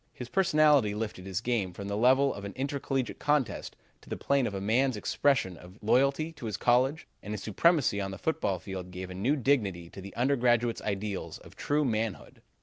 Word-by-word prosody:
His 125 -1 -7
personality 150 - +4
lifted 105 -4 -5
his 95 +1 -2
game 110 -7 -1
from 100 +3 -7
the 100 - -2
level 130 +5 +4
of 100 - -8
an 100 -1 -6
intercollegiate 135 -1 -2
contest 145 -8 0 0.3
to - - -17
the - - -3
plane 140 -3 +1
of 100 - -5
a - - -2
man's 120 +5 +1
expression 130 -4 +1
of 90 +3 -14
loyalty 140 +8 +2
to 135 -8 -8
his 105 -3 -3
college, 130 +8 +2 0.2
and 105 +1 -5
his 105 - -7
supremacy 125 - +2
on 95 - -3
the 95 - -6
football 105 -12 -1
field 90 0 -7
gave 90 0 -7
a - - -5
new 115 +11 +1
dignity 105 - 0
to 95 - -9
the 100 +1 -10
undergraduate's 120 -2 +2
ideals 100 -1 -3
of - - -16
true 150 +1 0
manhood. 110 -4 -3
115 Hz, 200 wpm, -29 LUFS, 100-135 Hz, 0.3 s, personality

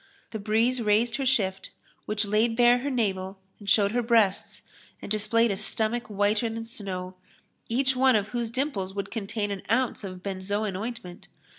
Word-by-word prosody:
The 220 - -4
breeze 225 +4 +1
raised 220 +2 +2
her 270 -2 -1
shift 195 -7 0 0.4
which 210 0 0
laid 215 +3 +2
bare 245 0 +6
her 280 +3 -2
navel 195 -6 -1 0.2
and 205 -1 -6
showed 200 0 +4
her 245 +2 +1
breasts 225 -5 +1 0.4
and - - -9
displayed 215 +2 +2
a - - 0
stomach 220 +3 -1
whiter 210 +2 +1
than 225 0 -5
snow, 190 -5 -6 0.6
each 260 +3 +1
one 260 -1 +4
of 205 -1 0
whose 235 -2 -2
dimples 225 -7 -2
would 200 - -4
contain 205 -1 -3
an 195 -2 -4
ounce 245 -1 +1
of 185 -2 -7
benzoin 200 +1 -2
ointment. 200 -4 -6
215 Hz, 170 wpm, -27 LUFS, 200-235 Hz, 0.6 s, bare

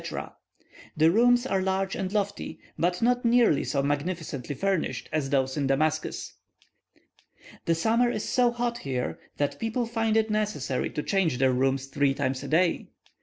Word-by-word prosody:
The 160 +2 +5
rooms 245 +4 +4
are 195 -7 0
large 190 0 -1
and 190 -1 -3
lofty, 205 -1 -2 0.2
but 175 +4 0
not 245 +1 +2
nearly 235 - +4
so 140 -2 -1
magnificently 145 -2 -3
furnished 195 +1 -1
as 150 -3 -1
those 135 -1 +1
in 140 -2 0
Damascus. 155 +3 -1 1.3
The 165 - +2
summer 230 +8 +2
is 215 -3 -3
so 250 -1 +3
hot 240 0 -2
here, 130 -3 -3 0.2
that 145 -1 -1
people 225 +2 -1
find 225 -1 0
it 220 0 +1
necessary 210 -12 -1
to 150 - -4
change 185 -9 +1
their 130 0 +3
rooms 135 +1 +1
three 135 0 +1
times 130 -1 -1
a - - -6
day. 170 +2 +1
180 Hz, 160 wpm, -27 LUFS, 140-225 Hz, 1.3 s, The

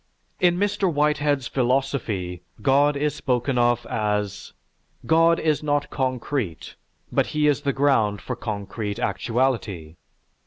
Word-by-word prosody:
In 175 -1 +3
Mr. 200 -1 +1
Whitehead's 145 -3 +1
philosophy, 120 -9 -1 0.2
God 140 +2 +4
is 150 +1 0
spoken 125 0 0
of 120 0 +2
as, 105 -2 -2 0.5
"God 165 +1 +4
is 155 -2 +1
not 145 -1 -1
concrete, 130 - -2 0.4
but - - +2
He 150 - +3
is 145 -1 +2
the 140 -1 0
ground 130 -7 +2
for 125 - -5
concrete 105 -2 -4
actuality." 105 -7 -1
130 Hz, 120 wpm, -24 LUFS, 110-145 Hz, 0.5 s, God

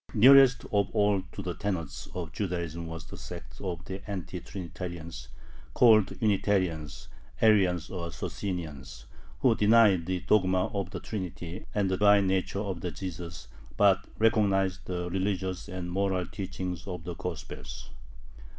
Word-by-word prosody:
Nearest 130 +3 +7
of 100 -1 +2
all 105 -2 +3
to 100 - -6
the 90 -1 -3
tenets 85 -6 -4
of 85 -4 -4
Judaism 85 -2 -3
was 80 -1 -7
the 75 - -10
sect - - -9
of 90 -2 -4
the 95 0 -6
Anti 95 -6 -4
Trinitarians 85 -2 -7 0.5
(called 110 -5 +5
Unitarians, 95 -8 0 0.3
Arians, 95 -6 +4
or 85 -3 -4
Socinians), 75 -12 -5 0.4
who 125 - +5
denied 105 -6 +5
the 90 -1 -1
dogma 95 -3 +2
of 100 -3 -2
the 95 -2 -5
Trinity 90 -4 -6
and 100 -2 +2
the 95 - +1
divine 100 0 +5
nature 95 +1 0
of 95 -5 -4
Jesus, 85 -7 -6 0.3
but 100 -2 +4
recognized 100 -4 +2
the 90 -1 -3
religious 95 -1 -2
and 90 -2 -5
moral 95 -1 0
teachings 90 -2 -5
of 90 -3 -5
the 85 - -5
Gospels. 85 -1 -7
95 Hz, 140 wpm, -29 LUFS, 85-100 Hz, 0.5 s, Nearest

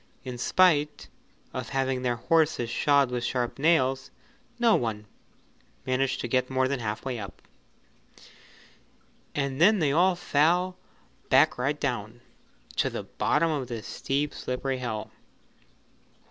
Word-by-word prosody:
In 125 -2 -6
spite 150 -1 +2 0.4
of 130 -3 -5
having 135 -1 -1
their 125 -1 0
horses 145 -2 +1
shod 140 0 +3
with 120 -1 -2
sharp 125 +1 -2
nails, 135 -4 +2 0.5
no 235 -2 +4
one 110 -3 -2 0.8
managed 130 +1 0
to - - -3
get 125 +1 0
more 130 0 +1
than 140 0 -2
half 110 0 -4
way 125 -3 -3
up, 100 -4 -9 1.9
and 140 0 -2
then 210 +5 +6
they 155 -6 +1
all 180 +5 +3
fell 175 +3 +1 0.5
back - - +4
right 145 +4 -1
down 120 -3 -3 0.6
to - - +2
the - - -5
bottom 165 +2 0
of 140 -5 -2
the 115 -3 -6
steep 140 +4 -2
slippery 130 +1 -3
hill. 110 -4 -4
130 Hz, 130 wpm, -27 LUFS, 120-150 Hz, 1.9 s, then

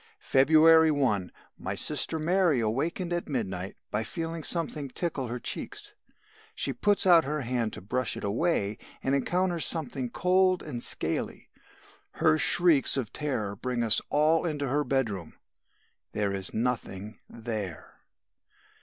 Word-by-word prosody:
"February 160 - +6
1. 120 -11 +1 0.3
My - - -3
sister 160 - -1
Mary 170 -2 +2
awakened 160 - -1
at 175 -2 -2
midnight 95 -8 -3 0.2
by 105 +2 0
feeling 165 +7 -4
something 150 -4 -2
tickle 140 -3 -3
her 120 +1 -4
cheeks. - - -6 0.6
She - - -1
puts 205 -1 +1
out 170 -3 +7
her 150 +1 -2
hand 120 -3 -1
to - - -8
brush 125 +5 -2
it - - -7
away 105 -2 0 0.2
and 135 - +1
encounters 175 +4 +1
something 135 -6 -2
cold 185 +4 +2
and 120 - -5
scaly. - - -2 0.6
Her 80 - +3
shrieks 165 -6 +3
of 120 -4 -3
terror 115 -9 -2
bring 125 +2 -2
us 110 -2 +3
all 155 +2 +3
into 150 -4 -2
her 145 +3 +1
bedroom 115 - -2 0.8
there 100 -2 0
is 95 -1 -4
nothing 110 -3 -3
there. 110 -7 -5
135 Hz, 135 wpm, -28 LUFS, 110-165 Hz, 0.8 s, out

